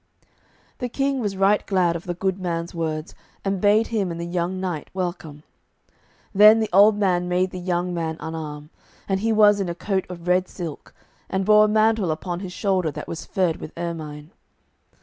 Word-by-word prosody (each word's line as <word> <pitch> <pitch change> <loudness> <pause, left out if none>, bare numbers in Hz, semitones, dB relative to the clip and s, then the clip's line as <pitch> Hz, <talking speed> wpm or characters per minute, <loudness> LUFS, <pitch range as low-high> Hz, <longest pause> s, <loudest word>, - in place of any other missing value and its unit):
The 250 - -3
King 275 +2 0
was 205 -5 -2
right 195 +2 +3
glad 180 -4 +2
of 170 - -6
the 175 -1 -3
good 190 +1 -1
man's 170 -2 -3
words, 160 0 -3 0.3
and 195 -1 -1
bade 210 +2 +3
him 210 -5 -1
and 170 0 -5
the 170 - -3
young 175 +1 -2
knight 180 -5 -4
welcome. 175 -5 -4 0.9
Then 210 +2 +8
the 220 - -2
old 205 +2 +6
man 180 -3 +1
made 180 +1 +1
the 185 - -6
young 180 0 -1
man 160 -2 -3
unarm; 155 -1 -6 0.4
and 195 -1 0
he 225 +3 0
was 210 -1 +5
in 190 -3 -1
a 170 - -4
coat 190 +1 -1
of 175 -1 -9
red 180 +1 +2
silk, 165 -5 -8 0.3
and 190 0 -1
bore 210 +1 +6
a - - +2
mantle 215 -2 +2
upon 175 +3 -3
his 190 -1 -6
shoulder 185 -3 0
that 150 0 -7
was 165 - -6
furred 180 -4 0
with 155 - -9
ermine. 155 -2 -6
180 Hz, 190 wpm, -23 LUFS, 170-200 Hz, 0.9 s, Then